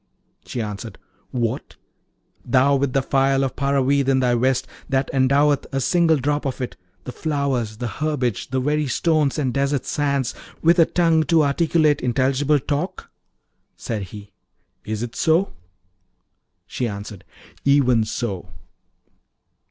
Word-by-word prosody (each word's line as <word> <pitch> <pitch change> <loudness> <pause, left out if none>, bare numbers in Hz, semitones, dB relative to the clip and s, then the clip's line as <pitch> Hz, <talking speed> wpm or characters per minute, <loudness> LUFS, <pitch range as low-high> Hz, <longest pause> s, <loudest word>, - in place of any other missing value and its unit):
She 120 - -3
answered, 105 0 -7 0.3
'What! 120 -3 -3 0.7
thou 130 +3 +3
with 135 -1 0
the 135 - +2
phial 135 0 +2
of 135 - -2
Paravid 140 0 +1
in 135 -1 +3
thy 125 -1 +2
vest, 130 +2 +1 0.2
that 135 0 0
endoweth, 140 +2 +3
a 135 - -1
single 165 +3 +3
drop 145 +2 -1
of 130 - -4
it, 125 - -4 0.3
the 125 - -6
flowers, 135 -7 -2
the 120 - -4
herbage, 135 -5 -2
the 130 0 0
very 150 +2 0
stones 155 +1 +1
and 130 -5 -1
desert 140 -1 0
sands, 140 -4 -1 0.3
with 170 +2 +4
a 165 - +7
tongue 165 -2 +3
to 160 +1 +4
articulate 150 0 +2
intelligible 135 +4 +2
talk?' 145 +6 -3 0.7
Said 110 -3 -4
he, 105 +1 -11 0.5
'Is 110 +1 -3
it 120 0 -6
so?' 165 +4 +2 1.1
She 125 - -3
answered, 100 -2 -7 0.4
'Even 130 -5 +4
so.' 110 -4 -4
135 Hz, 135 wpm, -22 LUFS, 125-145 Hz, 1.1 s, a